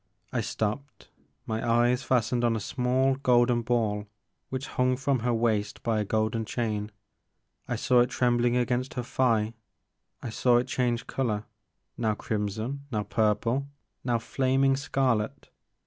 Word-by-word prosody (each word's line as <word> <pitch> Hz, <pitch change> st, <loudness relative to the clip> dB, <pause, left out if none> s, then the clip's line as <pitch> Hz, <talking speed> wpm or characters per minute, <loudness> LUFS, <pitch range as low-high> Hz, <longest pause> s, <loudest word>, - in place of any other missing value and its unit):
I -, -, +1 dB
stopped, 120 Hz, +7 st, -4 dB, 0.4 s
my 110 Hz, 0 st, -2 dB
eyes 120 Hz, +2 st, +3 dB
fastened 125 Hz, -1 st, +1 dB
on 120 Hz, -1 st, +3 dB
a -, -, -1 dB
small 130 Hz, +4 st, +1 dB
golden 120 Hz, -2 st, +3 dB
ball 110 Hz, -3 st, 0 dB, 0.4 s
which 130 Hz, +1 st, -3 dB
hung 125 Hz, 0 st, +1 dB
from 135 Hz, 0 st, +1 dB
her 120 Hz, +2 st, 0 dB
waist 110 Hz, -3 st, 0 dB
by 115 Hz, -2 st, +1 dB
a -, -, +1 dB
golden 110 Hz, +2 st, 0 dB
chain. 105 Hz, -2 st, -2 dB, 0.8 s
I -, -, -1 dB
saw 125 Hz, -, +3 dB
it 120 Hz, 0 st, +4 dB
trembling 120 Hz, -1 st, +2 dB
against 125 Hz, +1 st, -1 dB
her 125 Hz, -, -2 dB
thigh, 115 Hz, -3 st, +1 dB, 0.7 s
I 115 Hz, -, -4 dB
saw 120 Hz, +2 st, +3 dB
it 120 Hz, -, 0 dB
change 120 Hz, -2 st, 0 dB
color, 110 Hz, -6 st, -1 dB, 0.6 s
now 110 Hz, -2 st, +1 dB
crimson, 110 Hz, +7 st, -3 dB
now 105 Hz, -3 st, 0 dB
purple, 110 Hz, +6 st, +1 dB, 0.4 s
now 120 Hz, -2 st, +1 dB
flaming 135 Hz, +3 st, +2 dB
scarlet. 130 Hz, -5 st, -1 dB
120 Hz, 145 wpm, -28 LUFS, 110-130 Hz, 0.8 s, it